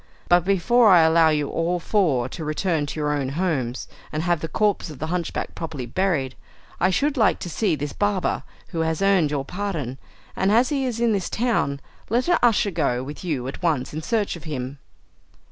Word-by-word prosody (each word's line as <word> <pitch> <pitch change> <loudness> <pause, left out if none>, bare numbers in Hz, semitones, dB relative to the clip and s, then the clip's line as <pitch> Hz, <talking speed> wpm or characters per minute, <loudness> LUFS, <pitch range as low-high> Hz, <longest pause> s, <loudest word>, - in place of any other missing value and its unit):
But 175 -1 +4
before 210 +5 +4
I 180 -3 +7
allow 160 0 +5
you 150 -2 +1
all 170 +3 -1
four 160 - +1
to 160 - -6
return 155 0 -1
to 155 - -5
your 150 -1 0
own 140 -3 -1
homes, 140 -6 -2 0.2
and 155 +1 -2
have 175 -2 +1
the 160 - -4
corpse 205 -1 0
of 150 - -9
the 155 - -3
hunchback 175 -2 -3
properly 155 -6 -5
buried, 140 -2 0 0.5
I 185 - +3
should 280 +9 +1
like 220 -5 +3
to 175 - -5
see 195 -4 +1
this 145 -1 -4
barber 205 -3 0 0.3
who 165 - -4
has 160 +2 0
earned 190 -6 +4
your 140 -2 -2
pardon. 165 -9 -4 0.4
And 195 - +1
as 240 +4 +4
he 275 -3 0
is 235 -2 -3
in 235 -1 +3
this 195 -3 -1
town, 205 - 0 0.3
let 240 +6 +1
an 350 - +3
usher 225 -4 +3
go 125 -7 0
with 145 +6 -8
you 145 -8 -2
at 135 - -7
once 150 -7 0
in 155 - -4
search 210 +2 -1
of 170 - -11
him." 135 -2 -5
165 Hz, 205 wpm, -23 LUFS, 145-200 Hz, 0.5 s, I